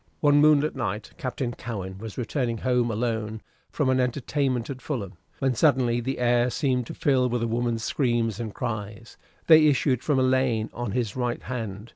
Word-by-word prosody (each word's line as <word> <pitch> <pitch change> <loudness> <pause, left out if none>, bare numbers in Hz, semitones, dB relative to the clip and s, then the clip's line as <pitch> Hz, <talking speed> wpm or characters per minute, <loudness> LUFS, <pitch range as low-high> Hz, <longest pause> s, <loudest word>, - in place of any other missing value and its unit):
One 145 -1 +4
moonlight 150 0 +4
night 110 -5 -3
Captain 125 -1 -3
Cowen 95 -6 -6
was 110 -1 -8
returning 120 -1 -1
home 125 0 +1
alone 110 -1 -2 0.3
from 145 - -1
an 130 0 +2
entertainment 130 0 -1
at 130 -1 -8
Fulham, 115 -10 -4 0.2
when 135 -1 +1
suddenly 125 -4 +2
the 135 +3 -3
air 120 0 +2
seemed 125 -2 0
to - - -7
fill 130 -3 +2
with 120 -1 -1
a - - 0
woman's 115 -1 -1
screams 120 -4 0
and 115 -2 -4
cries. 110 -1 -5 0.3
They 155 -1 +7
issued 135 -3 +2
from 145 -3 +1
a 130 - +3
lane 130 -4 +1
on 120 -4 -4
his 115 -4 -1
right 125 -2 -2
hand. 110 -3 -5
120 Hz, 180 wpm, -25 LUFS, 115-130 Hz, 0.3 s, They